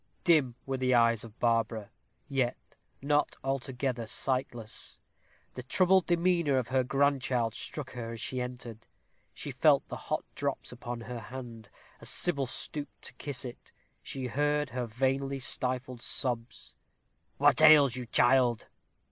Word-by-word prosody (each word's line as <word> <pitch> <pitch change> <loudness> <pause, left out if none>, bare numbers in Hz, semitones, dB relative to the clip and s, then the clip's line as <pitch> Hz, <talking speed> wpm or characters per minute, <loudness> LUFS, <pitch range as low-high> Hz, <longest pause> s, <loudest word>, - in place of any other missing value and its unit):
Dim 150 -8 +4
were 135 -1 -2
the 130 -1 +3
eyes 115 -2 +4
of 115 0 -12
Barbara, 115 -2 0 0.4
yet 130 -3 0 0.5
not 145 +1 +1
altogether 130 -3 -2
sightless. 120 -2 -2 0.5
The 125 - -6
troubled 185 +8 +3
demeanor 170 -4 +2
of 125 -2 -1
her 130 0 +2
grandchild 135 -4 +1
struck 135 +3 -6
her 115 -2 -6
as 115 - -7
she 130 +2 -3
entered. 125 -3 -7 0.4
She - - -6
felt - - +4
the - - -4
hot - - -1
drops - - -3
upon 120 -1 -6
her 120 +1 -6
hand 115 -1 -9 0.3
as - - -3
Sybil 140 -7 +1
stooped 145 +3 -4
to - - -7
kiss 140 -2 -4
it; 120 - -10 0.3
she 130 -1 -5
heard 145 +3 0
her 125 -1 -3
vainly 135 +4 0
stifled 130 -1 -1
sobs. 120 -3 -3 0.6
"What - - +4
ails 150 -5 +8
you, 125 -2 -5
child?" 120 -1 +3
130 Hz, 140 wpm, -30 LUFS, 120-140 Hz, 0.6 s, ails